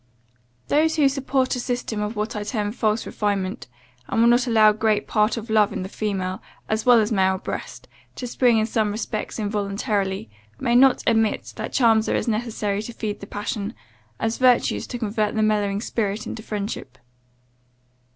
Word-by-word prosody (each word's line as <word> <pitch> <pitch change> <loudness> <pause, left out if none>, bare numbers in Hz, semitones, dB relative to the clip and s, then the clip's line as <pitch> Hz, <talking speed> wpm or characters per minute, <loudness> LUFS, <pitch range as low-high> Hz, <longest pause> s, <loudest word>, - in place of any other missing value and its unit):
"Those 315 +2 +2
who 295 -3 +4
support 270 -1 0
a - - -3
system 245 -3 -3
of 210 +2 -3
what 210 +2 -3
I 210 - -2
term 205 0 -2
false 215 -1 0
refinement, 200 -3 -2 0.4
and - - -1
will 230 - +6
not 240 +1 +3
allow 220 -2 +6
great 215 0 +1
part 215 +2 +1
of 225 0 -6
love 215 -2 +3
in - - -4
the 190 - -6
female, 190 -3 -3 0.3
as 220 +2 -1
well 245 -2 +8
as 215 0 0
male 190 -2 +2
breast, - - -6 0.3
to 250 - -5
spring 245 -1 +3
in 215 - +2
some 220 -2 0
respects 215 0 -4
involuntarily, 200 - -2 0.3
may 235 - 0
not 260 +1 +5
admit 225 -2 +1
that - - -4
charms 225 -3 +3
are - - +1
as - - -1
necessary 215 -3 -1
to 235 +2 -7
feed 215 -2 -4
the 200 - -9
passion, 205 +1 -4 0.4
as 225 0 -1
virtues 250 -2 +3
to 245 - -5
convert 215 -2 -1
the 215 - +2
mellowing 205 -2 +1
spirit 215 -2 -2
into 220 - -6
friendship. 205 - -5
215 Hz, 180 wpm, -23 LUFS, 205-235 Hz, 0.4 s, well